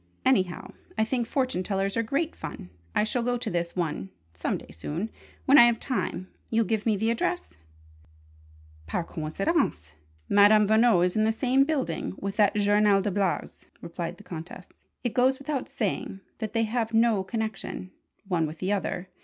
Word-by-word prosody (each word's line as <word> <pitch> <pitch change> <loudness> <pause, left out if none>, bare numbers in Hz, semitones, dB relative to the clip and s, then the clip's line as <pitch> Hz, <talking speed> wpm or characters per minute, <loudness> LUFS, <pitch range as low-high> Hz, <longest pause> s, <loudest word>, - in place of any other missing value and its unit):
Anyhow, 190 -9 +1 0.2
I 220 - +3
think 240 0 -1
fortune 255 -9 0
tellers 195 +1 -1
are 230 - +2
great 280 +8 -1
fun! 90 - -8 0.2
I - - +4
shall 225 +3 -1
go 245 +1 0
to 235 -3 -3
this 170 0 -2
one 155 - -2 0.2
some 85 - -2
day - - -13
soon: 155 - -4 0.3
when 275 +2 +7
I 240 - +10
have 235 -1 +2
time. 210 -8 -2 0.2
You'll 225 0 +2
give 220 0 -1
me 215 -2 +3
the 220 +3 +1
address?" 350 +9 -1 1.4
"Par 125 - -1
coincidence, 160 - -1 0.3
Madame 205 +1 +6
Veno 220 -4 +5
is 180 - -1
in 215 - +3
the 220 - +3
same 260 +4 +3
building 280 -9 -2
with 195 0 -4
that 205 -2 +4
journal 205 0 +4
des 200 +1 -1
blagues," 195 -1 -2
replied 170 0 -5
the 210 - -14
Countess. 175 0 -8 0.4
"It 245 - -1
goes 260 +1 +3
without 275 -1 -3
saying 195 -2 -3 0.2
that 220 -2 -4
they 225 -1 +2
have 225 0 -1
no 225 -4 +4
connection, 215 -2 -4 0.4
one 170 -4 +1
with 155 +1 -8
the 190 +4 -1
other. 190 -2 -2
210 Hz, 175 wpm, -27 LUFS, 185-235 Hz, 1.4 s, I